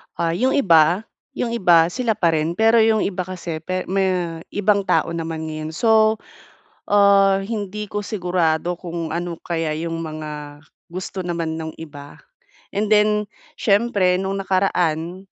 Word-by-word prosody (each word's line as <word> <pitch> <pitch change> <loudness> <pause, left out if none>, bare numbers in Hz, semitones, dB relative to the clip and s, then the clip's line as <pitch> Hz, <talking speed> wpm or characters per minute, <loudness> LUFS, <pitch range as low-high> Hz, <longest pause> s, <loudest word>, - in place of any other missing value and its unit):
Ah, 170 -1 0
yung 255 +11 +1
iba, 175 - +4 0.3
yung 235 - -2
iba 175 -7 +4
sila 235 +2 0
pa 170 -6 +2
rin. 160 +2 -1
Pero 225 +1 +4
yung 220 -1 +3
iba 185 -2 -2
kasi 175 -3 -5
pe 185 +3 -3
me 185 -3 0
ibang 205 -1 +1
tao 180 - +2
naman 165 -1 -4
ngayon. 155 0 -6
So, 220 +1 +4 0.7
ah, 200 -1 +4
hindi 210 -1 -5
ko 205 0 -3
sigurado 175 -4 -1
kung 170 -2 -5
ano 170 0 -4
kaya 165 -3 -2
yung 165 +1 -4
mga 150 -2 -7 0.2
gusto 185 +2 -6
naman 165 -2 -2
nung 160 0 -6
iba. 145 -3 -10 0.6
And 210 +1 0
then, 210 0 +3 0.3
siyempre 200 -3 +2
nung 195 +1 -2
nakaraan, 180 -2 0
180 Hz, 145 wpm, -21 LUFS, 165-205 Hz, 0.7 s, iba